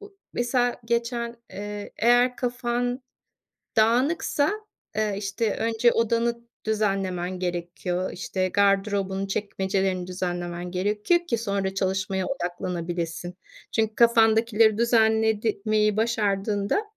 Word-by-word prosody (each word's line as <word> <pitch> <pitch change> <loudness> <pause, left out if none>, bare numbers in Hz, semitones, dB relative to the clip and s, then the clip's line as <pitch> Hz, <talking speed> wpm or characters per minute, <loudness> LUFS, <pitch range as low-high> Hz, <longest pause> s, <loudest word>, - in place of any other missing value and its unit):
bu 410 -1 -14 0.2
mesela 245 0 +1
geçen, 235 0 -1 0.2
eee, 205 0 -6
eğer 245 +2 +4
kafan 245 0 -1 0.8
dağınıksa, 265 +6 +3 0.5
eee, 215 -1 +1
işte, 205 +2 -1
önce 230 +1 +2
odanı 230 +1 +1 0.2
düzenlemen 195 -4 -1
gerekiyor. 175 +1 -3
İşte, 185 +1 -2
gardırobun 195 -1 +1
çekmecelerini 190 -2 -1
düzenlemen 175 -1 -4
gerekiyor 210 - +1
ki 235 - +1
sonra 200 -3 -1
çalışmaya 190 0 -1
odaklanabilesin. 175 -4 -3 0.4
Çünkü 220 -1 0
kafandakileri 225 -2 +4
düzenlemeyi 220 -2 +2
başardığında, 205 - 0
210 Hz, 90 wpm, -25 LUFS, 190-235 Hz, 0.8 s, eğer